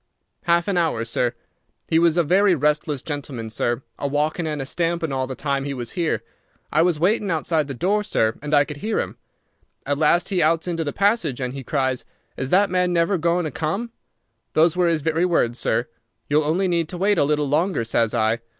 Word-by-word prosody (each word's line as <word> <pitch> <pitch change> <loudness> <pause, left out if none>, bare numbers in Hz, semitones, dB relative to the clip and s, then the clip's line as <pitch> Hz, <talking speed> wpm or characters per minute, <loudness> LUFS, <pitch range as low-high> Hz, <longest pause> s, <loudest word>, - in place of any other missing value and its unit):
"Half 170 -1 +2
an 195 -3 0
hour, 140 -9 0
sir. 120 +1 -1 0.5
He 160 - +3
was 170 0 +3
a 175 - +4
very 185 +4 +4
restless 150 -1 0
gentleman, 135 -7 -5
sir, 120 +3 -1 0.2
a 140 - -1
walkin' 150 +4 -1
and 150 -1 -3
a 135 - -3
stampin' 170 +1 -1
all 130 -1 -1
the 130 - -5
time 140 0 -1
he 140 0 -4
was 120 -2 -5
here. 170 -3 -1 0.5
I 155 - +3
was 170 -2 +2
waitin' 200 +4 +2
outside 160 -2 0
the 135 - -5
door, 200 - +1
sir, 110 - +1
and 150 0 -5
I 145 -1 +5
could 150 -1 -7
hear 215 +8 -1
him. - - -4 0.7
At 145 +1 -1
last 170 +2 +3
he 190 -3 +1
outs 165 +2 +2
into 165 -2 -1
the 145 - -3
passage, 200 - +1
and 125 -1 -3
he 135 -1 -6
cries, 130 -2 -1 0.3
'Is 130 - -3
that 195 +4 +3
man 180 -1 +2
never 175 +2 +2
goin' 170 +1 +1
to 155 - -3
come?' 195 - -3 0.6
Those 160 +2 +4
were 180 -1 +2
his 160 -3 0
very 160 +2 +1
words, 145 -10 +1
sir. - - 0 0.4
'You'll 150 +1 +2
only 175 +6 +1
need 170 -3 0
to 180 - -6
wait 195 0 +2
a - - +4
little 150 0 +1
longer,' 160 0 +1
says 115 0 0
I. 110 0 +1
155 Hz, 215 wpm, -22 LUFS, 140-175 Hz, 0.7 s, I